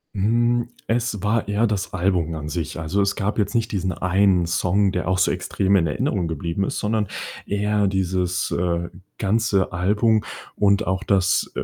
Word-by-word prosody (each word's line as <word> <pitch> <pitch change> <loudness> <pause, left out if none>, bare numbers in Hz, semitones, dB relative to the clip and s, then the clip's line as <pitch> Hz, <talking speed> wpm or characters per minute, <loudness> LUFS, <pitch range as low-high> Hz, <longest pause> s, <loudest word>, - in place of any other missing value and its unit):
Hm, 120 +4 +2 0.2
es 115 -4 -1
war 110 +1 +1
eher 105 +3 +2
das 100 -3 -3
Album 90 -3 0
an 75 -1 -5
sich. 80 -2 -4
Also, 80 +5 0
es 100 0 +1
gab 105 +1 -2
jetzt 105 +3 0
nicht 115 -1 0
diesen 95 -2 -1
einen 90 +1 +2
Song, 90 +3 +1
der 90 -1 -2
auch 95 0 +1
so - - +3
extrem 100 0 +1
in 85 -3 +2
Erinnerung 85 +4 -1
geblieben 85 +4 -2
ist, - - -3
sondern 105 0 0 0.4
eher 105 0 +1
dieses, 95 -1 -1
äh, 85 -1 -1 0.3
ganze 100 -2 +1
Album 105 +5 +2 0.3
und 100 -1 +3
auch, 95 +2 -1
dass, 100 0 +2
äh, - - -2
95 Hz, 175 wpm, -22 LUFS, 90-105 Hz, 0.4 s, so